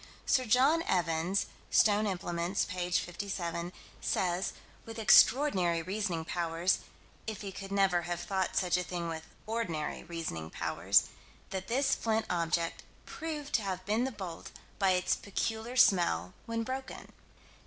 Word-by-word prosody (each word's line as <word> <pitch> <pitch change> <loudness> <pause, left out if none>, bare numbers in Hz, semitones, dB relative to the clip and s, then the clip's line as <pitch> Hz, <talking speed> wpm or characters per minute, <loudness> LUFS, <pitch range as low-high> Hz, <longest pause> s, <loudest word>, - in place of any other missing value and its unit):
Sir 260 -2 +3
John 265 +8 +4
Evans 175 +2 +1 0.2
(Stone 210 0 +4
Implements, 175 -1 -1
p. 180 -1 -3
57) 175 -1 -2 0.3
says 180 0 0 0.3
with 225 0 -9
extraordinary 205 - +5
reasoning 185 -3 -2
powers, 170 +1 0 0.5
if 220 -2 -4
he 200 -2 -5
could 195 0 -8
never 195 -3 +3
have 175 0 -3
thought 190 0 -1
such 180 -1 +2
a 180 - -1
thing 175 -1 -4
with 160 -1 -6 0.2
ordinary 195 -9 -3
reasoning 160 - -5
powers - - +2 0.5
that 190 0 -4
this 270 +3 +2
flint 225 -1 0
object 170 -1 0 0.2
"proved 300 -3 -5
to 230 - +3
have 185 -2 -4
been 220 +5 +1
the 265 - -2
bolt, 190 -7 -7 0.3
by 195 -2 +4
its 180 0 +2
peculiar 225 +4 -3
smell 170 - +4
when 230 0 -1
broken." 260 +2 -6
190 Hz, 140 wpm, -31 LUFS, 170-220 Hz, 0.5 s, extraordinary